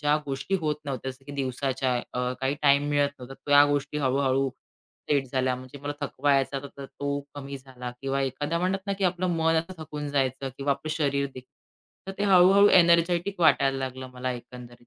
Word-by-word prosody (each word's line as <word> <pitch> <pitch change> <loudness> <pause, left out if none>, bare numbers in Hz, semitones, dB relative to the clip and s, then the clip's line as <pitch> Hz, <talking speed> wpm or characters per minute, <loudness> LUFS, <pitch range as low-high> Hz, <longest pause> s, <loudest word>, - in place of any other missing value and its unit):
ज्या 150 0 +3
गोष्टी 140 +7 -2
होत 150 -2 0
नव्हत्या 135 -2 -4
जसं 130 +1 -14
की 145 - -9
दिवसाच्या 130 -1 -1 0.2
अ, 125 0 -1
काही 135 +1 0
टाईम 140 0 +4
मिळत 145 -1 +3
नव्हता. 125 +1 -9
त्या 145 0 +7
गोष्टी 145 +1 -1
हळू-हळू 135 0 +1 0.6
सेट 140 -2 +2
झाल्या 130 -1 +1
म्हणजे 130 +2 -11
मला 145 0 -3
थकवा 145 0 +1
यायचा 135 0 +1 0.2
तर 140 - -7
तो 140 +1 -4
कमी 140 -1 -6
झाला 130 -2 -8
किंवा 135 0 -1
एखाद्या 145 +5 -2
म्हणतात 185 +2 -1
ना 200 - 0
की 195 - 0
आपलं 180 0 +1
मन 165 0 +2
असं 165 +1 -2
थकून 150 -1 -6
जायचं 135 -1 0
किंवा 140 0 +1
आपलं 140 +3 -5
शरीर 140 -3 0
देखील 130 0 -11 0.6
तर 195 - -4
ते 205 - 0
हळू-हळू 195 +1 +6
एनर्जेटिक 175 +2 +4
वाटायला 140 -4 +4
लागलं 130 0 -5
मला 125 0 -3
एकंदरीत. 120 0 -11
140 Hz, 190 wpm, -26 LUFS, 130-155 Hz, 0.6 s, त्या